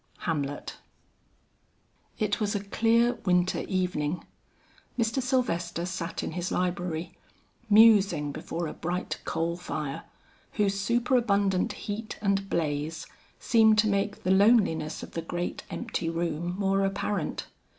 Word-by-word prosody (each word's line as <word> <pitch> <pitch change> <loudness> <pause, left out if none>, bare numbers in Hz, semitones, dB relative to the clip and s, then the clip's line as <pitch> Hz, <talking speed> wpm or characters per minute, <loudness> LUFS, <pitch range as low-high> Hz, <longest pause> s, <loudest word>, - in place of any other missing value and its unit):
HAMLET. 145 -4 -3 1.4
It 210 -1 0
was 210 -1 0
a 200 - -2
clear 230 +4 +2
winter 180 -1 +2
evening. 180 -4 -1 0.7
Mr. 230 +2 +1
Sylvester 180 -10 0
sat 180 -2 -4
in - - -3
his 175 +2 -3
library, 175 -2 -2 0.5
musing 205 -9 +6
before 170 +4 -4
a 155 - -4
bright 175 +2 -3
coal 165 +1 -1
fire, 150 -5 -4 0.5
whose 200 -2 +1
superabundant 205 -4 +2
heat 215 +1 -4
and 195 -1 0
blaze 155 0 -2 0.3
seemed 220 -2 +4
to 215 0 +4
make 200 0 -1
the 185 - +1
loneliness 190 -7 +3
of - - -9
the 165 - -3
great 175 +2 -4
empty 210 -8 -3
room 170 +1 -2
more 195 0 +2
apparent. 195 -3 -2
185 Hz, 120 wpm, -28 LUFS, 170-210 Hz, 1.4 s, musing